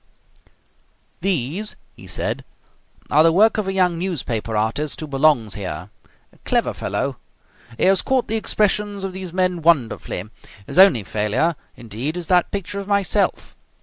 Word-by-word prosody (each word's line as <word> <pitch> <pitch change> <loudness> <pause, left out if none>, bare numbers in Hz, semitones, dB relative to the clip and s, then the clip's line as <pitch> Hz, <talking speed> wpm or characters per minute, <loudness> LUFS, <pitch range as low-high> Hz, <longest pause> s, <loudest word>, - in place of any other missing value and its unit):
"These," 185 - -1 0.2
he - - -14
said, - - -3 0.7
"are 150 - +6
the 165 +1 +5
work 215 +6 +4
of 205 - -2
a - - 0
young 180 -3 +1
newspaper 120 - -2
artist 125 +8 -1
who 155 - -4
belongs 135 -7 +2
here. 90 -1 -6 0.4
A - - -24
clever - - 0
fellow. - - -3 0.6
He - - -1
has 190 0 +4
caught 260 -2 0
the 220 - -1
expressions 210 -2 0
of 190 -1 -4
these 185 -2 -6
men 180 -1 0
wonderfully. 140 - +1 0.4
His 180 - -1
only 165 - +7
failure, 110 - 0 0.2
indeed, 120 - -5
is 175 - -4
that 180 -1 +4
picture 200 0 -4
of 200 - -7
myself." 200 0 0
170 Hz, 150 wpm, -21 LUFS, 125-195 Hz, 0.7 s, only